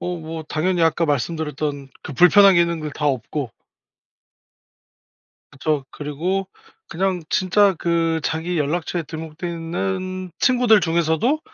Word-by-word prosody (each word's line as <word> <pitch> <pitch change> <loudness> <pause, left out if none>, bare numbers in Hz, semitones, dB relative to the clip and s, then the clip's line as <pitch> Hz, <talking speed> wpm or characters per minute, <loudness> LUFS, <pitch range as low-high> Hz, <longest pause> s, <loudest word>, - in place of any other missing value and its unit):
어 180 0 -3
뭐 160 0 -6
당연히 170 +3 -1
아까 165 +1 +2
말씀드렸던 150 -1 -2
그 150 - -7
불편한 190 +5 +6
기능들 170 -3 +1
다 150 - -2
없고 130 -1 -2 2.0
그쵸. 145 0 -1
그리고 170 +7 -3 0.4
그냥 185 +1 -1
진짜 195 +1 +3
그 165 -1 0
자기 165 +2 -2
연락처에 165 +3 -1
등록돼 160 +2 -7
있는 185 +2 -4
친구들 245 -5 +4
중에서도 170 - +1
165 Hz, 260 characters per minute, -21 LUFS, 155-185 Hz, 2.0 s, 불편한